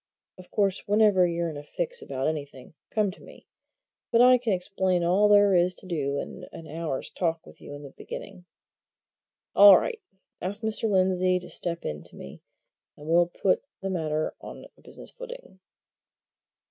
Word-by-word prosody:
Of 180 Hz, -, -13 dB
course, 200 Hz, -2 st, 0 dB
whenever 205 Hz, -3 st, +4 dB
you're 170 Hz, -1 st, -2 dB
in 150 Hz, -, -8 dB
a 145 Hz, -, -8 dB
fix -, -, -4 dB
about 135 Hz, 0 st, -4 dB
anything, 145 Hz, -4 st, -5 dB, 0.2 s
come 210 Hz, -3 st, 0 dB
to -, -, -16 dB
me -, -, -15 dB, 0.7 s
but 230 Hz, -, +4 dB
I 250 Hz, +1 st, +7 dB
can 235 Hz, -2 st, -1 dB
explain 185 Hz, -1 st, 0 dB
all 190 Hz, +5 st, +4 dB
there 205 Hz, -1 st, +6 dB
is 180 Hz, 0 st, +3 dB
to -, -, -6 dB
do 145 Hz, -6 st, -2 dB
in -, -, -6 dB
an 165 Hz, -, -10 dB
hour's 155 Hz, -3 st, -5 dB
talk 165 Hz, -2 st, -2 dB
with -, -, -16 dB
you 145 Hz, -, -9 dB
at 145 Hz, -, -10 dB
the 140 Hz, -, -10 dB
beginning. 185 Hz, +4 st, -9 dB, 1.1 s
All 200 Hz, -1 st, +10 dB
right! 465 Hz, -3 st, -3 dB, 0.4 s
ask 205 Hz, +4 st, -4 dB
Mr. 220 Hz, 0 st, -1 dB
Lindsey 185 Hz, -1 st, +2 dB
to 180 Hz, -, -8 dB
step 170 Hz, -1 st, -2 dB
in 75 Hz, 0 st, -4 dB
to -, -, -10 dB
me, 70 Hz, -, -11 dB, 0.6 s
and 150 Hz, -, -12 dB
we'll 170 Hz, +1 st, +4 dB
put 185 Hz, +2 st, 0 dB, 0.2 s
the 195 Hz, 0 st, -3 dB
matter 155 Hz, -3 st, -2 dB
on -, -, -10 dB
a -, -, -24 dB
business -, -, -11 dB
footing." -, -, -11 dB
185 Hz, 175 wpm, -26 LUFS, 160-205 Hz, 1.1 s, All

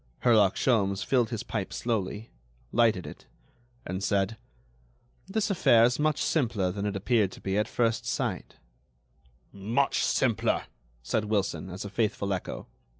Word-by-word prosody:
Herlock 110 Hz, -6 st, +5 dB
Sholmes 100 Hz, -5 st, +1 dB
filled 125 Hz, -4 st, +2 dB
his 115 Hz, -1 st, -4 dB
pipe 105 Hz, -6 st, -4 dB
slowly, 110 Hz, -1 st, -3 dB, 0.4 s
lighted 110 Hz, -6 st, +2 dB
it, -, -, -11 dB, 0.6 s
and 95 Hz, +2 st, -4 dB
said: 100 Hz, +2 st, +1 dB, 0.9 s
"This 210 Hz, +1 st, -1 dB
affair 120 Hz, -11 st, +5 dB
is 125 Hz, +3 st, +2 dB
much 155 Hz, 0 st, +1 dB
simpler 110 Hz, -, 0 dB
than 100 Hz, +2 st, -3 dB
it 100 Hz, -, -3 dB
appeared 100 Hz, 0 st, +1 dB
to -, -, -11 dB
be 95 Hz, 0 st, -2 dB
at 105 Hz, +1 st, +1 dB
first 115 Hz, -2 st, 0 dB
sight." -, -, -3 dB, 1.0 s
"Much 115 Hz, +8 st, 0 dB
simpler," 115 Hz, -7 st, +1 dB, 0.4 s
said 105 Hz, -, -1 dB
Wilson, 100 Hz, -3 st, -1 dB
as 95 Hz, +3 st, -6 dB
a -, -, -5 dB
faithful 105 Hz, -2 st, 0 dB
echo. 95 Hz, -, -5 dB
110 Hz, 145 wpm, -28 LUFS, 100-120 Hz, 1.0 s, Herlock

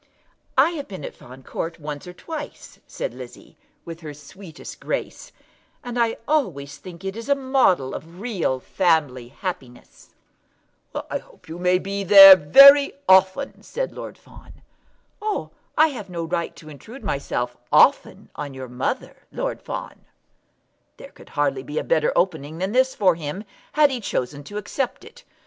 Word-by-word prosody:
"I 285 Hz, +6 st, +5 dB
have 290 Hz, -4 st, -6 dB
been 185 Hz, -7 st, -8 dB
at -, -, -7 dB
Fawn 130 Hz, +2 st, -14 dB
Court 165 Hz, +5 st, -5 dB
once 150 Hz, +1 st, -7 dB
or 180 Hz, -, -9 dB
twice," 300 Hz, -, -9 dB
said -, -, -5 dB
Lizzie, -, -, -12 dB, 0.3 s
with 165 Hz, -1 st, -8 dB
her 155 Hz, -3 st, -9 dB
sweetest 160 Hz, +3 st, -12 dB
grace, -, -, -5 dB, 0.5 s
"and 245 Hz, -1 st, -6 dB
I 230 Hz, -1 st, +1 dB
always 175 Hz, -, -1 dB
think 185 Hz, 0 st, -12 dB
it 195 Hz, +1 st, -4 dB
a 280 Hz, -, +4 dB
model 260 Hz, -, +1 dB
of 165 Hz, +3 st, -9 dB
real 195 Hz, -, -2 dB
family 150 Hz, -7 st, 0 dB
happiness." 130 Hz, -4 st, -8 dB, 1.0 s
"I -, -, -1 dB
hope -, -, -21 dB
you 165 Hz, +2 st, -8 dB
may 180 Hz, 0 st, +3 dB
be 195 Hz, +2 st, -4 dB
there 195 Hz, 0 st, +11 dB
very 275 Hz, -, +8 dB
often," 190 Hz, +8 st, +3 dB
said -, -, -4 dB
Lord -, -, -9 dB
Fawn. -, -, -17 dB, 0.6 s
"Ah, 425 Hz, 0 st, -3 dB, 0.3 s
I 315 Hz, +1 st, +6 dB
have 225 Hz, -9 st, -8 dB
no 170 Hz, -2 st, -4 dB
right 165 Hz, +1 st, -3 dB
to 155 Hz, -, -14 dB
intrude 220 Hz, -, -12 dB
myself 125 Hz, -8 st, -3 dB, 0.2 s
often -, -, +3 dB
on 145 Hz, -2 st, -7 dB
your 130 Hz, -1 st, -8 dB
mother, 125 Hz, +1 st, -4 dB
Lord -, -, -4 dB
Fawn." -, -, -7 dB, 0.9 s
There -, -, -12 dB
could -, -, -17 dB
hardly 140 Hz, -2 st, -1 dB
be 145 Hz, +3 st, -7 dB
a -, -, 0 dB
better 155 Hz, -2 st, +1 dB
opening 160 Hz, -4 st, -1 dB
than 190 Hz, +3 st, -2 dB
this 260 Hz, +2 st, +2 dB
for 185 Hz, -3 st, +3 dB
him 165 Hz, +4 st, -6 dB, 0.3 s
had 300 Hz, -2 st, +4 dB
he 250 Hz, -2 st, -4 dB
chosen 145 Hz, -, -3 dB
to 205 Hz, -, -7 dB
accept 240 Hz, +5 st, -4 dB
it. -, -, -15 dB
180 Hz, 160 wpm, -22 LUFS, 145-240 Hz, 1.0 s, there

